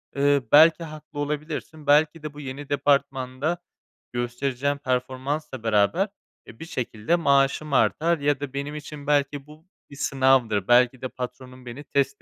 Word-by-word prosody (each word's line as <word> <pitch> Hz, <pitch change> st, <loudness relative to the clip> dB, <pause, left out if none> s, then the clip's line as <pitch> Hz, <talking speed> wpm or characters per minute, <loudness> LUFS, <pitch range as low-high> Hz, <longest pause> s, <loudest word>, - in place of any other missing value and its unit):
eee, 140 Hz, 0 st, +3 dB
belki 160 Hz, +3 st, +7 dB
haklı 155 Hz, -2 st, -9 dB
olabilirsin. 150 Hz, +1 st, -4 dB
Belki 150 Hz, +2 st, +3 dB
de 155 Hz, -2 st, -6 dB
bu 145 Hz, -, -11 dB
yeni 140 Hz, 0 st, -7 dB
departmanda 140 Hz, +1 st, 0 dB, 0.6 s
göstereceğim 125 Hz, +3 st, -2 dB
performansla 130 Hz, +1 st, -3 dB
beraber, 110 Hz, -, +2 dB, 0.4 s
eee, 115 Hz, -, -13 dB
bir -, -, -7 dB
şekilde 120 Hz, -1 st, -1 dB
maaşım 140 Hz, -2 st, +2 dB
artar 165 Hz, +5 st, +2 dB
ya 145 Hz, -1 st, +1 dB
da 140 Hz, -2 st, -6 dB
benim 140 Hz, +2 st, -4 dB
için 150 Hz, -1 st, -9 dB
belki 145 Hz, -1 st, 0 dB
bu 155 Hz, +2 st, -16 dB, 0.2 s
bir 140 Hz, -, -12 dB
sınavdır. 130 Hz, -8 st, +2 dB
Belki 125 Hz, +1 st, +4 dB
de 130 Hz, -, -2 dB
patronum 125 Hz, 0 st, -8 dB
beni 125 Hz, +4 st, -8 dB
test 140 Hz, -1 st, -1 dB
140 Hz, 145 wpm, -24 LUFS, 130-150 Hz, 0.6 s, belki